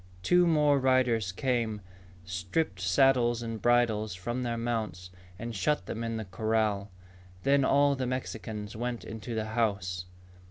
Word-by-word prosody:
Two 180 Hz, -, +4 dB
more 150 Hz, -3 st, +4 dB
riders 125 Hz, -6 st, +2 dB
came, 115 Hz, 0 st, -1 dB, 0.5 s
stripped 95 Hz, -, -2 dB
saddles 120 Hz, +3 st, +3 dB
and 115 Hz, -2 st, -5 dB
bridles 115 Hz, -4 st, +2 dB
from 120 Hz, +7 st, -3 dB
their 120 Hz, -1 st, -2 dB
mounts, 110 Hz, -7 st, -3 dB, 0.3 s
and 115 Hz, +2 st, -5 dB
shut 150 Hz, +10 st, 0 dB
them 115 Hz, -, -4 dB
in 115 Hz, -1 st, -2 dB
the 110 Hz, -, -4 dB
corral. 105 Hz, +1 st, 0 dB, 0.5 s
Then 140 Hz, 0 st, +4 dB
all 140 Hz, +1 st, +4 dB
the 130 Hz, -1 st, -2 dB
Mexicans 110 Hz, -4 st, -4 dB
went 120 Hz, +1 st, -3 dB
into 110 Hz, +2 st, -6 dB
the 110 Hz, -1 st, -1 dB
house. 100 Hz, -6 st, -1 dB
115 Hz, 145 wpm, -29 LUFS, 105-130 Hz, 0.5 s, Two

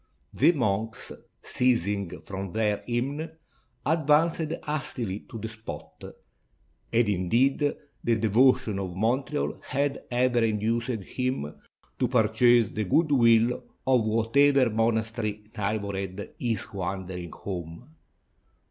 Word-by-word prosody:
The -, -, +5 dB
monks, 115 Hz, -, -2 dB, 0.3 s
ceasing 100 Hz, -7 st, 0 dB
from 95 Hz, -1 st, -6 dB
their 105 Hz, -2 st, 0 dB
hymn, 130 Hz, +5 st, -1 dB, 0.6 s
advanced 160 Hz, +1 st, +2 dB
hast 150 Hz, -1 st, -3 dB
ily 105 Hz, -5 st, -2 dB
to -, -, -7 dB
the 110 Hz, -, -5 dB
spot; 110 Hz, 0 st, -9 dB, 0.9 s
and 115 Hz, -1 st, +3 dB
indeed 120 Hz, -, +2 dB, 0.3 s
the 115 Hz, -, +2 dB
devotion 115 Hz, 0 st, +3 dB
of 95 Hz, -2 st, -4 dB
Montreal 130 Hz, +8 st, -1 dB
had 140 Hz, +1 st, -1 dB
ever 125 Hz, -1 st, +2 dB
induced 115 Hz, +1 st, 0 dB
him 120 Hz, -, -3 dB, 0.5 s
to 125 Hz, -, +2 dB
purchase 120 Hz, -1 st, +4 dB
the 110 Hz, -1 st, -2 dB
good 155 Hz, -, +2 dB
will 115 Hz, -2 st, +4 dB, 0.2 s
of 125 Hz, -4 st, +3 dB
whatever 125 Hz, +4 st, +3 dB
monastery 110 Hz, -1 st, -1 dB
neighbored 100 Hz, -2 st, -3 dB
his 115 Hz, -3 st, -2 dB
wandering 95 Hz, -2 st, -4 dB
home. 90 Hz, -, -7 dB
115 Hz, 110 wpm, -27 LUFS, 100-130 Hz, 0.9 s, The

